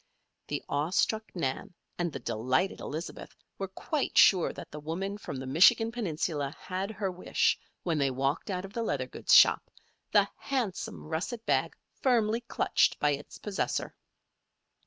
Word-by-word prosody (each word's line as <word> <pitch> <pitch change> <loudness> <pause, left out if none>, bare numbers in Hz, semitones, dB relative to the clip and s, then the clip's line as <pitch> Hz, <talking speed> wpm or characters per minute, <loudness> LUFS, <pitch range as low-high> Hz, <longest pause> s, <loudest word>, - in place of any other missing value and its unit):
The - - -3
awe 145 +3 0
struck 220 +4 +1
Nan 140 +1 -3 0.2
and 175 -1 0
the - - -5
delighted 130 - 0
Elizabeth 155 +4 -6 0.2
were 195 - -2
quite 280 - -3
sure 185 -4 +6
that - - -10
the 150 - -7
woman 175 +7 -3
from 140 - -6
the 130 - -5
Michigan 190 - +5
Peninsula 160 - -2
had 190 +2 -3
her 210 -3 -2
wish 180 0 +1 0.3
when 165 -4 0
they 140 -1 +2
walked 135 +8 -1
out 185 -1 -2
of 195 - -11
the 235 - -2
leather 230 - -1
goods - - +2
shop, - - +6 0.4
the - - +5
handsome 250 -9 -3
russet 170 +9 -4
bag - - +1 0.3
firmly 230 -3 +2
clutched 240 - +1
by 150 - +2
its 145 +1 -5
possessor. 205 -2 -2
180 Hz, 155 wpm, -29 LUFS, 150-215 Hz, 0.4 s, sure